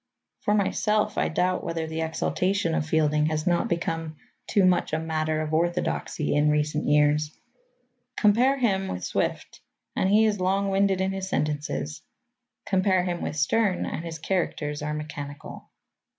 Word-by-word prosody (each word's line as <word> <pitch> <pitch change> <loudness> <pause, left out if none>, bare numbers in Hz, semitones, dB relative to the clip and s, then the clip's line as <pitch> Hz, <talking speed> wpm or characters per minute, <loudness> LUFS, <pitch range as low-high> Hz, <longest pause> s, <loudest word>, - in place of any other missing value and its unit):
For 210 - +1
myself, 210 +1 +1
I - - +1
doubt 180 +3 0
whether 165 -1 -2
the 160 0 -4
exaltation 165 +3 0
of 155 - -1
Fielding 150 -1 +2
has 155 -1 -1
not 175 -1 +2
become 165 -2 -2 0.3
too 200 -2 +3
much 180 -3 +2
a 155 - +1
matter 155 -1 -1
of 155 0 -4
orthodoxy 170 -2 0
in 150 +1 +3
recent 150 0 0
years. 150 +1 +2 0.8
Compare 240 +6 +4
him 195 -7 +1
with 90 0 -5
Swift, - - -2 0.3
and 190 - +1
he 215 +2 +5
is 210 -2 +1
long 195 +2 +1
winded 195 -1 +2
in 190 0 0
his 190 0 -4
sentences. 145 - -2 0.6
Compare 185 -1 +2
him 175 -1 -3
with 150 - -3
Sterne, 185 +5 +1
and 160 - -4
his 165 -1 -5
characters 150 -4 -2
are 150 0 -2
mechanical. 145 -1 -7
165 Hz, 155 wpm, -26 LUFS, 150-190 Hz, 0.8 s, he